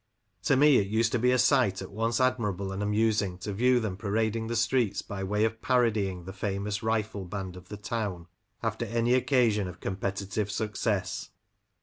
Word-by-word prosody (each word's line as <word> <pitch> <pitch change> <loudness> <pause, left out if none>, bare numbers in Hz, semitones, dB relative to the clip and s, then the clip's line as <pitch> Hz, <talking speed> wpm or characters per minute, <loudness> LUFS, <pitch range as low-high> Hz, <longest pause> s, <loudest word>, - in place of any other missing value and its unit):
To - - +4
me 145 -1 +6
it 95 - +1
used 110 +2 +1
to 125 - +1
be 125 +2 +3
a 125 - +3
sight 125 -8 +3
at 95 - -7
once 115 +3 0
admirable 105 -7 0
and 95 +1 -4
amusing 105 -2 +1
to 100 +3 -5
view 125 +4 +3
them 105 -5 -3
parading 110 +2 -1
the 120 - -2
streets 115 -1 +1
by 95 -1 -5
way 105 +3 +1
of 110 0 -3
parodying 105 -8 +1
the 95 - -7
famous 100 +1 -3
rifle 110 -2 -1
band 95 0 -5
of 90 0 -13
the 105 - -6
town 105 -5 -3 0.4
after 115 +1 -1
any 115 +2 +1
occasion 120 -6 +2
of 90 - -9
competitive 100 +2 -3
success. 105 -1 -2
105 Hz, 185 wpm, -28 LUFS, 95-115 Hz, 0.4 s, me